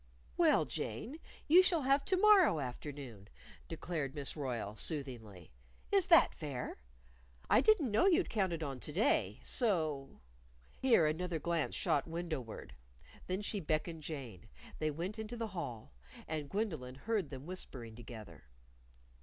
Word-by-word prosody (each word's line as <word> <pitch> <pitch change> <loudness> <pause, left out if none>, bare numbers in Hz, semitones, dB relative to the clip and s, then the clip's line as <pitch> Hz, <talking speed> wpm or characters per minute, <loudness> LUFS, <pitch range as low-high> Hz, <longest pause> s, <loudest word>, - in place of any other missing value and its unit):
"Well, - - +4
Jane, 245 - -5 0.3
you 345 +5 +9
shall 350 -5 +2
have 275 +2 +3
to 375 - +2
morrow 380 - +6
afternoon," 130 -5 -6 0.4
declared 160 -4 -4
Miss 140 -2 -2
Royle, 120 -8 -3
soothingly. 110 - -5 0.4
"Is 395 -3 +4
that 335 -2 +7
fair? 140 -5 -5 0.7
I - - +7
didn't 360 - +4
know 220 - +4
you'd 360 -1 +4
counted 185 -7 0
on 135 -3 -4
to 150 - -6
day. 215 - +1
So 155 - 0 0.3
" - - -29
Here 240 -11 +5
another 165 +3 -1
glance 170 0 -1
shot 145 - +1
window 165 -3 -3
ward. 115 - -9 0.5
Then 185 +3 -2
she 205 0 -2
beckoned 160 0 -2
Jane. 125 - -7 0.3
They 155 - +1
went 175 +8 -4
into 220 +2 -5
the 230 -1 -3
hall. 125 - -6 0.3
And 155 -3 -3
Gwendolyn 160 - -2
heard 200 +2 -1
them 135 0 -8
whispering 130 -10 -7
together. 110 - -10
155 Hz, 145 wpm, -35 LUFS, 130-215 Hz, 0.7 s, you